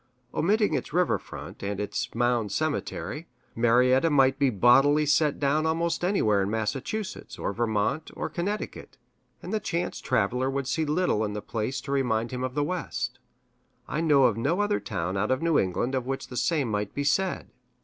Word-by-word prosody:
Omitting 205 Hz, +6 st, +2 dB
its -, -, -3 dB
river 180 Hz, 0 st, +2 dB
front, -, -, -10 dB
and 100 Hz, 0 st, -3 dB
its 115 Hz, +5 st, -2 dB
Mound 120 Hz, -3 st, +1 dB
Cemetery, 155 Hz, +2 st, -3 dB, 0.3 s
Marietta 125 Hz, +5 st, +4 dB
might 135 Hz, -2 st, +3 dB
be 140 Hz, -2 st, +4 dB
set 105 Hz, -6 st, -7 dB
bodily 140 Hz, +6 st, +5 dB, 0.3 s
down 150 Hz, +3 st, +1 dB
almost 170 Hz, +1 st, 0 dB
anywhere 110 Hz, -, +2 dB
in 95 Hz, -, -1 dB
Massachusetts, 135 Hz, -, -3 dB
or -, -, -2 dB
Vermont, 110 Hz, +7 st, -1 dB
or -, -, -3 dB
Connecticut, 200 Hz, +5 st, -4 dB, 0.5 s
and -, -, -5 dB
the 215 Hz, -, +1 dB
chance 175 Hz, -3 st, -3 dB
traveler 125 Hz, +6 st, +1 dB
would 140 Hz, 0 st, -2 dB
see 160 Hz, +3 st, 0 dB
little 150 Hz, -7 st, +1 dB
in 105 Hz, -1 st, -2 dB
the 105 Hz, -, -3 dB
place 115 Hz, +5 st, -3 dB
to 140 Hz, -, -7 dB
remind 120 Hz, -4 st, 0 dB
him 125 Hz, 0 st, -3 dB
of 130 Hz, 0 st, -3 dB
the 145 Hz, -, +1 dB
West. 180 Hz, +3 st, -3 dB, 0.7 s
I 155 Hz, -, -2 dB
know 150 Hz, -4 st, +4 dB
of 120 Hz, -4 st, +3 dB
no 165 Hz, -, 0 dB
other 205 Hz, -, +1 dB
town 95 Hz, -2 st, -3 dB
out 105 Hz, +2 st, 0 dB
of 130 Hz, +4 st, 0 dB
New 165 Hz, -2 st, +3 dB
England 100 Hz, +7 st, -1 dB
of 130 Hz, -2 st, -1 dB
which 135 Hz, 0 st, -4 dB
the 125 Hz, -, -8 dB
same 155 Hz, -4 st, +1 dB
might 105 Hz, -1 st, -2 dB
be 145 Hz, -, -1 dB
said. 185 Hz, +6 st, 0 dB
135 Hz, 185 wpm, -27 LUFS, 115-160 Hz, 0.7 s, bodily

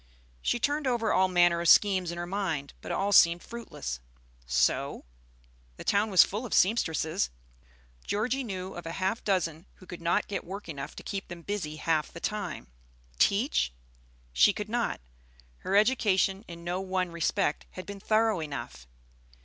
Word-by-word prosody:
She 240 Hz, -, 0 dB
turned 290 Hz, +2 st, 0 dB
over 235 Hz, -3 st, +1 dB
all 190 Hz, -, +4 dB
manner 175 Hz, -2 st, +3 dB
of 170 Hz, -, +2 dB
schemes 190 Hz, -4 st, +5 dB
in 170 Hz, -, -6 dB
her 175 Hz, -, -3 dB
mind, 175 Hz, -7 st, -3 dB
but -, -, -6 dB
all 200 Hz, +1 st, 0 dB
seemed 170 Hz, -3 st, +6 dB
fruitless. 225 Hz, -, -6 dB, 0.5 s
Sew? 65 Hz, -1 st, +1 dB, 0.7 s
The -, -, -8 dB
town 205 Hz, +2 st, +2 dB
was 185 Hz, -5 st, +8 dB
full 210 Hz, +5 st, -4 dB
of 240 Hz, -, -2 dB
sempstresses. 160 Hz, -, +2 dB, 0.8 s
Georgie 245 Hz, +6 st, 0 dB
knew 190 Hz, -5 st, -5 dB
of 175 Hz, -, -8 dB
half 190 Hz, +6 st, -1 dB
a -, -, -26 dB
dozen 175 Hz, -4 st, -1 dB
who 185 Hz, -, -16 dB
could 175 Hz, -1 st, -9 dB
not 170 Hz, 0 st, +1 dB
get 200 Hz, -, -3 dB
work 195 Hz, +3 st, -7 dB
enough 145 Hz, -2 st, -6 dB
to -, -, -9 dB
keep 195 Hz, -1 st, -4 dB
them 170 Hz, -1 st, -9 dB
busy 185 Hz, -7 st, -3 dB
half 155 Hz, -1 st, 0 dB
the 170 Hz, -, -9 dB
time. 210 Hz, +4 st, -3 dB, 0.5 s
Teach? -, -, +2 dB, 0.6 s
She 205 Hz, -, +5 dB
could 210 Hz, 0 st, -5 dB
not; 235 Hz, -, -1 dB, 0.6 s
her 195 Hz, -, -2 dB
education 205 Hz, -3 st, +3 dB
in 170 Hz, -1 st, -9 dB
no 175 Hz, +2 st, -2 dB
one 185 Hz, -2 st, -1 dB
respect 170 Hz, -1 st, 0 dB
had 185 Hz, -, -7 dB
been 200 Hz, 0 st, -7 dB
thorough 220 Hz, -1 st, +2 dB
enough. 140 Hz, -, -6 dB
185 Hz, 165 wpm, -29 LUFS, 170-210 Hz, 0.8 s, was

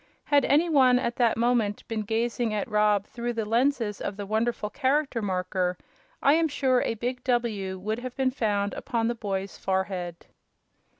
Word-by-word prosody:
Had 285 Hz, -2 st, +3 dB
any 310 Hz, +5 st, +3 dB
one, 260 Hz, -6 st, +5 dB
at 235 Hz, -1 st, -2 dB
that 235 Hz, -3 st, +3 dB
moment, 230 Hz, -3 st, +1 dB
been 225 Hz, -1 st, -2 dB
gazing 225 Hz, +1 st, -1 dB
at 210 Hz, -, -2 dB
Rob 210 Hz, -2 st, +2 dB
through 240 Hz, +1 st, -4 dB
the 225 Hz, -2 st, -2 dB
lenses 230 Hz, -1 st, +1 dB
of 195 Hz, -, -4 dB
the 205 Hz, -, -4 dB
wonderful 220 Hz, 0 st, -1 dB
Character 275 Hz, -2 st, 0 dB
Marker, 185 Hz, -2 st, -1 dB, 0.5 s
I 280 Hz, -, +6 dB
am 325 Hz, +1 st, +3 dB
sure 265 Hz, -4 st, +1 dB
a 230 Hz, -, -1 dB
big 250 Hz, +3 st, -4 dB
"W" 220 Hz, -7 st, -1 dB
would 215 Hz, +5 st, -3 dB
have 250 Hz, 0 st, -7 dB
been 265 Hz, -1 st, +1 dB
found 205 Hz, -5 st, 0 dB
upon 230 Hz, -3 st, -1 dB
the -, -, 0 dB
boy's 200 Hz, -4 st, -4 dB
forehead. 190 Hz, -3 st, -2 dB
230 Hz, 175 wpm, -27 LUFS, 205-250 Hz, 0.5 s, I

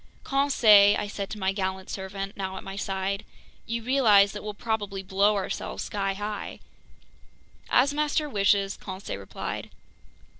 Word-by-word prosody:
"Conseil," 225 Hz, -8 st, +5 dB
I -, -, -2 dB
said 200 Hz, -1 st, -5 dB
to 215 Hz, -, -6 dB
my 190 Hz, -1 st, 0 dB
gallant 190 Hz, -1 st, -3 dB
servant, 195 Hz, +1 st, -5 dB
now 190 Hz, -1 st, -4 dB
at -, -, -7 dB
my 195 Hz, -, -7 dB
side, 195 Hz, 0 st, -2 dB, 0.4 s
"you 230 Hz, 0 st, -3 dB
realize 220 Hz, -6 st, +5 dB
that 210 Hz, -, -7 dB
we'll 210 Hz, -1 st, -5 dB
probably 205 Hz, -4 st, -3 dB
blow 200 Hz, +2 st, +2 dB
ourselves 195 Hz, -1 st, -3 dB
skyhigh?" 205 Hz, +1 st, -3 dB, 1.1 s
"As 275 Hz, +3 st, +4 dB
master 300 Hz, +1 st, 0 dB
wishes!" 200 Hz, -4 st, +2 dB
Conseil 190 Hz, +1 st, -6 dB
replied. -, -, -6 dB
200 Hz, 140 wpm, -26 LUFS, 195-215 Hz, 1.1 s, Conseil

